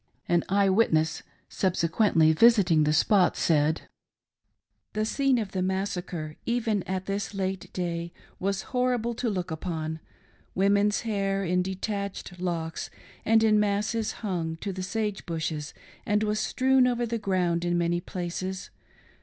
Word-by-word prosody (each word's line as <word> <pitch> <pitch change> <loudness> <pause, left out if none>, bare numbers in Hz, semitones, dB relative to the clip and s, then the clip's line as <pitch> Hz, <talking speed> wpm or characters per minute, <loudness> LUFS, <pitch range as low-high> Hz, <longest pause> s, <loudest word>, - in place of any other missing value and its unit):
An 175 -1 +2
eye 200 0 +3
witness^ 165 -6 +2 0.3
subsequently 165 -2 +2
visiting 185 -6 +5
the 150 - +2
spot 180 +4 +3
said: 155 0 +2 0.5
— - - -52
The 215 0 0
scene 270 +3 +2
of 210 -4 -3
the 185 - -2
massacre, 180 -4 -3
even 230 -4 0
at 185 0 -2
this 200 +1 -3
late 190 -1 -3
day, 170 -1 -3 0.3
was 195 0 -1
horrible 250 -2 +1
to 235 +1 -2
look 180 -5 -3
upon. 160 -1 -4 0.6
Women's 200 +2 +3
hair 195 -3 -1
in 180 +1 +2
detached 190 -1 -4
locks 165 -3 -3 0.4
and 220 0 +4
in 215 -1 +4
masses 210 +2 0
hung 170 -5 -2
to 195 +3 -4
the 185 - -5
sage 210 +2 -2
bushes 160 -3 -3 0.3
and 210 +1 +1
was 210 0 0
strewn 255 +6 +3
over 240 -1 0
the 230 0 -2
ground 180 -4 0
in 175 0 +1
many 175 0 +1
places. 185 +1 -5
190 Hz, 145 wpm, -27 LUFS, 170-210 Hz, 0.6 s, visiting